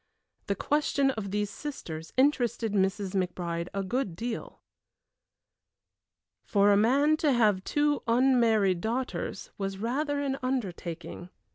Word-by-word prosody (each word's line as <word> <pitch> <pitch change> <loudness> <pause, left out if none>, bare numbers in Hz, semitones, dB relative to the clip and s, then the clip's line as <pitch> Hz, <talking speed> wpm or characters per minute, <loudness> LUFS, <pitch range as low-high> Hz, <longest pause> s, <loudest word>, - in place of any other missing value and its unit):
The 200 - 0
question 280 +3 +1
of 220 -5 -5
these 205 +1 -1
sisters 165 - -7
interested 240 -5 +2
Mrs. 195 0 0
McBride 175 -2 -2
a 195 0 -2
good 205 -3 -2
deal. 230 +4 -5 1.8
For 200 0 +3
a - - +6
man 275 +9 +4
to 305 -2 +2
have 210 -6 +3
two 290 +3 +1
unmarried 230 -7 +3
daughters 230 -2 -3
was 195 -1 -3
rather 285 +7 -1
an 275 -1 -2
undertaking. 180 -9 -4
220 Hz, 120 wpm, -28 LUFS, 195-265 Hz, 1.8 s, a